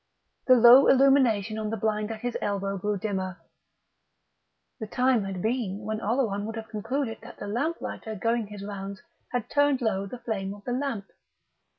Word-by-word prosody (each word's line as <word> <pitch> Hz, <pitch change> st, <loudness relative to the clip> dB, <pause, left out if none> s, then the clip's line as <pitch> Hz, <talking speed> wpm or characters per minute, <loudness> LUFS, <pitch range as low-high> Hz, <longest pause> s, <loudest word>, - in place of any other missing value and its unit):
The 255 Hz, -, +8 dB
low 245 Hz, +3 st, +8 dB
illumination 250 Hz, -6 st, +4 dB
on 215 Hz, -1 st, -2 dB
the 225 Hz, -, -2 dB
blind 215 Hz, 0 st, -1 dB
at 220 Hz, -1 st, -6 dB
his 245 Hz, -1 st, -3 dB
elbow 200 Hz, -1 st, -1 dB
grew 205 Hz, +2 st, -1 dB
dimmer 190 Hz, -2 st, -3 dB, 1.4 s
(the 220 Hz, -, -5 dB
time 250 Hz, -2 st, +2 dB
had 190 Hz, -2 st, -5 dB
been 220 Hz, -4 st, -1 dB
when 215 Hz, +1 st, -3 dB
Oleron 215 Hz, -3 st, 0 dB
would 225 Hz, -, -5 dB
have 225 Hz, 0 st, -7 dB
concluded 225 Hz, +3 st, -3 dB
that 235 Hz, +1 st, -12 dB
the -, -, -7 dB
lamplighter 230 Hz, -1 st, -3 dB
going 230 Hz, +1 st, 0 dB
his 205 Hz, -1 st, -8 dB
rounds 200 Hz, -1 st, -7 dB, 0.3 s
had 245 Hz, -2 st, -2 dB
turned 285 Hz, -1 st, +2 dB
low 200 Hz, -5 st, -1 dB
the 250 Hz, -, -7 dB
flame 200 Hz, -4 st, -4 dB
of 205 Hz, -, -15 dB
the 245 Hz, -, -4 dB
lamp). 255 Hz, -6 st, -2 dB
220 Hz, 175 wpm, -27 LUFS, 200-245 Hz, 1.4 s, The